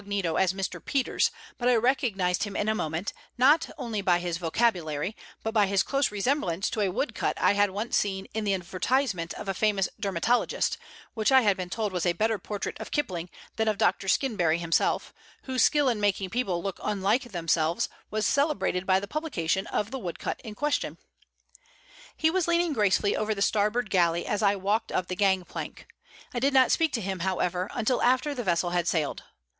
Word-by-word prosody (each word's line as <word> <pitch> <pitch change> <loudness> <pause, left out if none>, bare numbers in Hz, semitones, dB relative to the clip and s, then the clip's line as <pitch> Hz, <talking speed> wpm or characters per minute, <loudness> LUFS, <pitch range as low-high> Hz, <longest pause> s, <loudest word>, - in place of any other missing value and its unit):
_ 200 -5 0
as 190 -2 +3
Mr. 190 -2 -4
Peters, 275 -3 +1 0.3
but 245 0 +2
I 250 - +5
recognized 220 -7 +1
him 205 -2 -3
in 205 - -1
a 215 - +3
moment, 160 -1 -3 0.2
not 290 +6 +4
only 225 -4 -3
by 180 -2 +3
his 175 -1 -3
vocabulary, 175 -2 0 0.3
but 225 - -2
by 210 -3 +4
his 195 0 +2
close 275 -3 0
resemblance 200 - 0
to 215 - -1
a 200 - +2
wood 260 +10 -2
cut - - -2
I - - +4
had 205 0 +3
once 210 +5 0
seen 195 -1 -2
in 220 0 -2
the 200 -2 +1
advertisement 185 +1 -1
of - - -7
a 195 - 0
famous 200 -1 +1
dermatologist, 200 +5 0 0.3
which 220 +2 +1
I 265 0 +7
had 205 -4 +3
been 185 -1 -5
told 210 0 -2
was 180 -1 0
a 175 - +3
better 220 +2 0
portrait 205 -1 -5
of - - -7
Kipling 180 - -2 0.3
than 220 - +1
of 215 -2 +1
Dr. 195 - +1
Skinberry 180 - +2
himself, 170 -1 0 0.3
whose 260 -2 -1
skill 295 -2 +4
in 230 -4 +1
making 195 -2 0
people 190 -8 -1
look 195 -2 -4
unlike 210 +5 0
themselves 165 -2 +1 0.2
was 215 0 -1
celebrated 280 - +1
by 190 0 +4
the 200 - -7
publication 195 - -1
of 210 +2 -2
the 265 - -4
wood 175 -7 -5
cut - - -4
in 215 -2 -8
question. 295 +5 -1 1.2
He 315 - +3
was 370 -1 0
leaning 340 -1 +2
gracefully 205 -3 +2
over 215 0 -1
the 200 - -5
starboard 215 +2 +1
galley 170 -2 +2
as 210 - -1
I 200 -1 +3
walked 205 +4 -1
up 180 - -1
the 185 - -2
gang 190 -2 +2
plank. - - -7 0.5
I 245 - -1
did 275 +2 +1
not 260 -1 +6
speak 325 -2 +2
to 230 - -1
him, 190 -1 -3
however, 180 0 -1
until 245 +1 0
after 255 +4 +2
the 250 -3 -4
vessel 175 -2 +1
had 175 -1 0
sailed. 160 -4 -1
205 Hz, 200 wpm, -27 LUFS, 180-240 Hz, 1.2 s, I